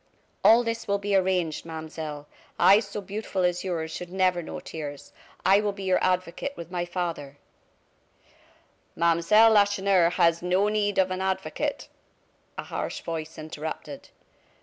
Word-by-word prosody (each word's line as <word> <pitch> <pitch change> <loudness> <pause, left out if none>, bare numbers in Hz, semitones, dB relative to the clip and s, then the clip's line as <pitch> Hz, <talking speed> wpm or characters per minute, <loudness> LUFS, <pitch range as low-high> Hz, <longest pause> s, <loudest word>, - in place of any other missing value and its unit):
All 230 +2 +7
this 230 0 -3
will 200 0 +1
be 200 0 -1
arranged, 180 -4 +1
Mademoiselle. 160 -2 -7 0.3
Eyes 200 +2 +6
so 205 +1 -5
beautiful 200 -1 -3
as 180 0 0
yours 165 -4 -3
should 175 +2 -7
never 185 -2 +1
know 160 - -7
tears. 145 -3 -8 0.3
I 195 +2 +5
will 205 -1 -1
be 195 0 -8
your 185 -1 +1
advocate 185 +8 -1
with 170 0 -9
my 175 -1 -2
father 170 -6 -4 0.8
" - - -33
"Mademoiselle 170 +7 +4
Lacheneur 200 -4 +4
has 170 0 +3
no 185 +4 +2
need 205 -1 0
of 185 -1 +3
an 185 0 -3
advocate!" 190 0 -2 0.7
a - - -4
harsh - - -5
voice 160 -1 -5
interrupted. 155 -2 -7
185 Hz, 150 wpm, -26 LUFS, 165-200 Hz, 0.8 s, All